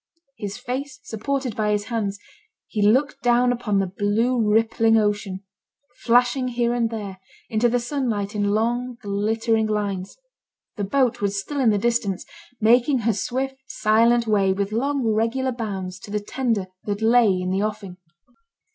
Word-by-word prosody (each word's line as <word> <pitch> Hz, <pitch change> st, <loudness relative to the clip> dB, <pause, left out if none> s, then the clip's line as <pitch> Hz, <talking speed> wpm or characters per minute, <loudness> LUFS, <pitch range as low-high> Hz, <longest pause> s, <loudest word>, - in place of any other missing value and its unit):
His 205 Hz, -4 st, -5 dB
face 260 Hz, +2 st, -5 dB
supported 255 Hz, +1 st, -3 dB
by 215 Hz, -1 st, 0 dB
his 205 Hz, 0 st, 0 dB
hands, 205 Hz, -3 st, -2 dB, 0.5 s
he 215 Hz, -, -3 dB
looked 260 Hz, +9 st, +2 dB
down 245 Hz, +1 st, +3 dB
upon 235 Hz, -4 st, -1 dB
the 195 Hz, -, +2 dB
blue 215 Hz, +6 st, 0 dB
rippling 225 Hz, 0 st, +3 dB
ocean, 205 Hz, -2 st, -1 dB, 0.6 s
flashing 245 Hz, +2 st, +3 dB
here 240 Hz, -1 st, 0 dB
and 235 Hz, -2 st, +1 dB
there, 205 Hz, -4 st, -6 dB, 0.3 s
into 225 Hz, +2 st, +3 dB
the 245 Hz, +1 st, +1 dB
sunlight 235 Hz, -6 st, -2 dB
in 205 Hz, -1 st, 0 dB
long, 240 Hz, +3 st, 0 dB
glittering 220 Hz, +2 st, 0 dB
lines. 200 Hz, -3 st, -3 dB, 0.6 s
The 205 Hz, -, -2 dB
boat 255 Hz, +2 st, +1 dB
was 200 Hz, 0 st, 0 dB
still 285 Hz, +8 st, -4 dB
in 250 Hz, -4 st, +4 dB
the 210 Hz, -, +3 dB
distance, 225 Hz, -3 st, 0 dB, 0.3 s
making 245 Hz, +4 st, +4 dB
her 225 Hz, 0 st, +2 dB
swift 265 Hz, +6 st, -3 dB
silent 230 Hz, +2 st, +3 dB
way 200 Hz, -3 st, +2 dB
with 200 Hz, +1 st, -2 dB
long 270 Hz, +3 st, 0 dB
regular 230 Hz, +4 st, +1 dB
bounds 195 Hz, -6 st, -5 dB
to 195 Hz, -, -12 dB
the 210 Hz, +1 st, -1 dB
tender 225 Hz, -2 st, -1 dB, 0.2 s
that 205 Hz, +1 st, -3 dB
lay 225 Hz, -5 st, +4 dB
in 180 Hz, 0 st, -2 dB
the 190 Hz, +1 st, 0 dB
offing. 210 Hz, -4 st, -4 dB
225 Hz, 155 wpm, -23 LUFS, 205-245 Hz, 0.6 s, in